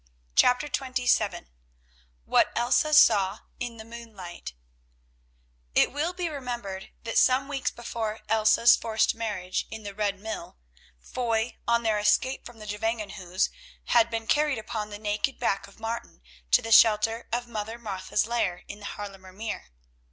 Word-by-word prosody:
CHAPTER 250 +4 +5
XXVII 255 - 0 0.8
WHAT - - +3
ELSA 250 +6 +3
SAW 205 -8 +5 0.2
IN 240 -1 -4
THE 220 - -9
MOONLIGHT 210 - -9 1.2
It - - +4
will 310 +5 -1
be 360 -1 -2
remembered 240 -10 -5
that 230 -1 +2
some 260 +2 +4
weeks 280 -2 -1
before 225 -2 -4
Elsa's 220 +2 +5
forced 220 -1 +1
marriage 205 -5 -3
in 220 -1 -8
the 200 -1 -6
Red 200 -1 -1
Mill, 220 - -6 0.4
Foy, 230 - -1
on 235 0 +3
their 220 -2 +2
escape 210 +6 +1
from 240 -1 -14
the 215 - -10
Gevangenhuis, 210 -4 -2 0.4
had 235 -1 +5
been 225 -1 -3
carried 295 +1 +2
upon 215 -1 -4
the 205 - -7
naked 210 +5 -1
back 200 0 -1
of 200 - -18
Martin 225 - -5 0.3
to - - +5
the 225 - -4
shelter 225 +1 +5
of 240 +1 -1
Mother 225 0 -5
Martha's 205 -3 -1
lair 200 -6 -1
in 205 - -8
the 205 - -10
Haarlemer 195 -2 -8
Meer. 215 +3 -5
225 Hz, 150 wpm, -27 LUFS, 205-240 Hz, 1.2 s, CHAPTER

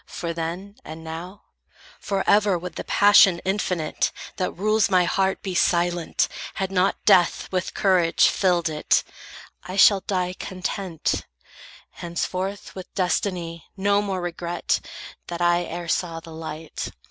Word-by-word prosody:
For 170 -1 -4
then, 175 +5 -5
and 160 +1 -9
now, 170 +5 -8 0.6
Forever 200 0 +2
would 180 +1 -7
the - - -5
passion 200 -3 +6
infinite, 185 -5 -1 0.3
That 185 - 0
rules 215 +3 +1
my 185 -2 +4
heart, 190 +2 0
be 190 - -3
silent, 175 -1 +1 0.3
had 190 -1 -2
not 190 0 +1
death 180 -4 +4
With 185 -1 -2
courage 180 -4 +4
filled 180 -3 +2
it. 155 -1 +1 0.6
I 185 - -7
shall 200 0 +7
die 180 -2 -2
content; 185 -2 -3 0.6
Henceforth, 185 +3 -4
with 185 -1 -9
destiny, 180 -3 -2
no 200 +1 +2
more 195 -3 -3
regret 175 0 -2 0.5
That 170 -1 -5
I 175 0 +2
e'er 170 +1 -6
saw 170 -1 -1
the 165 0 -12
light. 160 0 -6
180 Hz, 135 wpm, -24 LUFS, 170-195 Hz, 0.6 s, shall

